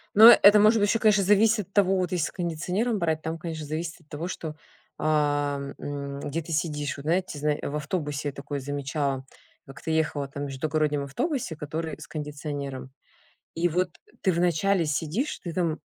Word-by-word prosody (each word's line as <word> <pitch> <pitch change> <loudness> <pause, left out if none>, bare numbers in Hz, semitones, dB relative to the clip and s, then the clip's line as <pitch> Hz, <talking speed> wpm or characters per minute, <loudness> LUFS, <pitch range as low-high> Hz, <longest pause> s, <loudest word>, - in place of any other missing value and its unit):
Но 220 +3 +11
это 210 -3 +8
может 215 +2 +5
быть 205 0 +2
ещё 225 - +2
конечно 210 -3 +4
зависит 210 0 +4
от 195 - -38
того. 195 -2 +4
Вот 180 -2 -1
если 170 -3 +1
с - - -8
кондиционером 180 +7 -1
брать, 160 -3 0
там 160 +1 -3
конечно 160 -2 -5
зависит 160 +3 -4
от 160 - -25
того 155 +4 -4
что, 160 -4 -5 0.4
а, 145 -2 +1 0.2
м, 140 -1 -5
где 145 +4 -3
ты 165 +1 -6
сидишь. 150 -2 -1
Вот 140 - -8
знаете, 170 0 0
зна 150 0 +1
в 140 - -4
автобусе 150 -2 -2
такое 140 +1 -5
замечала. 140 -1 -2 0.4
Как-то 140 +4 -6
ехала 150 -3 0
там 140 +1 -5
в - - -2
междугороднем 150 +1 0
автобусе, 175 - -2
который 160 +2 -4
с - - -10
кондиционером, 145 -3 -5 0.6
и 170 +2 +2
вот 180 +2 0 0.3
ты 190 - +3
вначале 175 +1 +2
сидишь, 165 - -1
ты 170 - -5
там 165 -3 -1
155 Hz, 180 wpm, -26 LUFS, 145-180 Hz, 0.6 s, Но